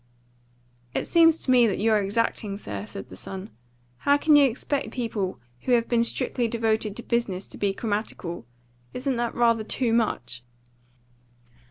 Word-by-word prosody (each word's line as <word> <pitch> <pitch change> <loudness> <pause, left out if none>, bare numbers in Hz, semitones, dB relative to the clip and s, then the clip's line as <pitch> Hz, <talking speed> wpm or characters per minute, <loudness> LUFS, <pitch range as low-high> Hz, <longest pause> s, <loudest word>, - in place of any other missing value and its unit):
"It - - 0
seems 330 -1 +5
to 255 - +1
me 245 -2 +6
that 200 - -1
you're 215 0 +3
exacting, 200 0 -1
sir," 100 - -6
said 95 - -9
the 95 - -10
son. 190 - -7 0.5
"How 285 - +3
can 300 +1 +4
you 290 -1 +7
expect 275 +4 -2
people 215 - -3 0.2
who 250 - 0
have 235 -1 +3
been 235 -1 +2
strictly 235 +1 -1
devoted 220 -2 0
to 240 - -6
business 210 -6 -1
to - - -9
be 200 -1 +1
grammatical? 205 - -3 0.5
Isn't 255 0 -1
that 235 -1 -2
rather 230 -2 +3
too 230 +1 -1
much?" 165 - -1
225 Hz, 160 wpm, -25 LUFS, 200-240 Hz, 0.5 s, you